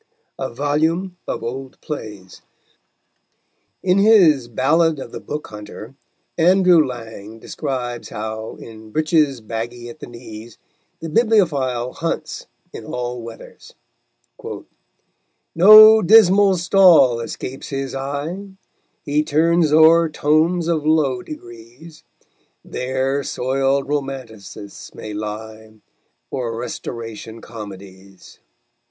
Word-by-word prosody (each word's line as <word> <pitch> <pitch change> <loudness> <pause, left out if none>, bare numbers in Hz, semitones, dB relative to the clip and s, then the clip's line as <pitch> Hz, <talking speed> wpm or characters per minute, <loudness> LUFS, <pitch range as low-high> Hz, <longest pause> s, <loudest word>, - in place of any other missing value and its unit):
] - - -41
A - - -3
VOLUME 160 +8 -1
OF - - -4
OLD 130 +3 -6
PLAYS 105 - -8 1.4
In 185 +1 +2
his 180 - +5
Ballad 155 +7 +1
of 135 - -8
the - - -7
Book 150 +1 -6
Hunter, 105 +3 -10 0.5
Andrew 180 -1 +5
Lang 115 -4 -8
describes 125 -1 -5
how, 110 +1 -6
in 110 -1 -12
breeches 150 -1 +1
baggy 120 +2 -6
at 120 - -12
the - - -9
knees, 115 -2 -11 0.4
the 165 - -5
bibliophile 150 - +1
hunts 165 0 -4 0.3
in - - -8
all 125 0 -5
weathers: 115 0 -12 1.8
_No 215 +3 +8
dismal 200 -2 +6
stall 170 -9 +5
escapes 125 +3 -7
his 135 -1 -4
eye; 145 +8 -5 0.6
He 150 +1 0
turns 160 +1 +2
o'er 160 +1 +6
tomes 160 +3 +1
of 165 -3 0
low 150 -5 +1
degrees; 120 +4 -12 0.6
There 130 +2 -2
soiled 135 +2 -1
romanticists 130 -8 -7
may 110 - -8
lie, 110 +1 -7 0.6
Or 120 -3 -3
Restoration 115 -2 -7
comedies_. 100 -4 -12
135 Hz, 105 wpm, -20 LUFS, 115-160 Hz, 1.8 s, No